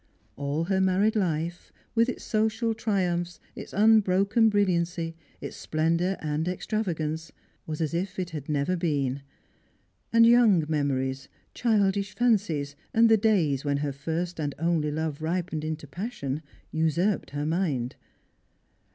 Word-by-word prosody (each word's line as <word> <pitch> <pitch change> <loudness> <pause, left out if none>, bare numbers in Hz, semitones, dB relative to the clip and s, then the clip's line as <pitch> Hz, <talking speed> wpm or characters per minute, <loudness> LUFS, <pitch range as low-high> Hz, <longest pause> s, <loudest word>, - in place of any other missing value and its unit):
All 140 +3 -2
her 190 +2 +1
married 190 +4 +2
life— 170 -3 -2 0.2
with 230 +2 +3
its - - -5
Bocial 220 +1 +1
triumphs, 180 -5 -1 0.2
its - - -8
unbroken 215 +1 +4
brilliancy, 170 -5 0 0.3
its - - -6
splendour 165 +4 0
and 155 +1 -1
extravagance 165 -5 -2 0.2
— - - -40
was 155 0 -4
as 160 0 -1
if 180 +3 -2
it 180 -1 -3
had 150 -3 -6
never 150 +4 +1
been; 140 -6 -1 0.9
and 230 0 +6
young 230 -8 +5
memories, 135 -3 -1 0.3
childish 200 -3 +1
fancies, 185 -12 +1 0.2
and 225 0 +6
the 225 - +7
days 190 - +2
when 145 -1 0
her 145 -1 -2
first 165 +5 -3
and 145 -2 -2
only 165 -2 +1
love 155 0 -3
ripened 165 -1 -2
into 155 -1 -4
passion, 150 - -4 0.3
usurped 160 +6 +1
her 145 +1 -3
mind. 155 -7 -1
170 Hz, 135 wpm, -27 LUFS, 150-200 Hz, 0.9 s, the